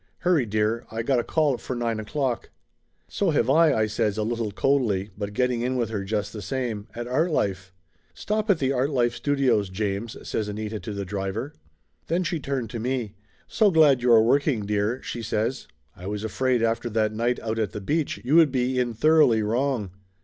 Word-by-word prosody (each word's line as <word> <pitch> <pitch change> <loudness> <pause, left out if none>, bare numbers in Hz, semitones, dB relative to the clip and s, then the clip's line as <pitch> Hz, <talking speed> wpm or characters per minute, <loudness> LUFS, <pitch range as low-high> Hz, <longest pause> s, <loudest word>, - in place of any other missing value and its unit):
Hurry, 170 -9 +2
dear, 110 +2 0
I 115 +1 -3
got 130 0 +2
a - - -1
call 150 -6 +1
for 130 - -5
nine 115 -2 -1
o'clock." 125 +2 -2 0.6
"So - - 0
have 120 +3 +2
I," 160 +1 +5
I 110 - +2
says 110 -1 -1
a 110 - 0
little 115 0 -2
coldly, 105 -5 +1
but 100 0 -5
getting 125 +1 0
in 125 +2 -1
with 120 -3 -1
her 105 -3 -2
just 105 0 -2
the 105 - -6
same. 120 -3 -3
"At 120 0 -4
Artlife!" 120 - 0 0.4
"Stop 215 +1 -2
at 195 - +5
the 135 -3 0
Artlife 130 -2 +1
studios, 125 -5 +1
James," 105 +3 -3
says 110 - -2
Anita 105 +1 -4
to 110 - -6
the 100 -1 -4
driver. 100 +7 -4 0.5
Then 170 +3 0
she 170 -2 -2
turned 135 -4 -3
to 115 - -4
me. 120 -3 -2 0.3
"So 215 -2 +3
glad 155 -7 +5
you 125 0 +3
are 110 -1 +7
working, 130 -2 +2
dear," 105 +4 -1
she 120 - -5
says. 115 +3 -2 0.3
"I 90 - -9
was 105 +1 -4
afraid 125 +2 0
after 115 +1 0
that 110 -1 0
night 120 +3 0
out 110 0 -3
at 110 -4 -1
the - - -5
beach 150 +10 -1
you 135 +6 +1
would 160 -4 +6
be 130 0 0
in 120 -2 -1
thoroughly 125 -4 +4
wrong 115 -2 -1
120 Hz, 200 wpm, -25 LUFS, 105-135 Hz, 0.6 s, are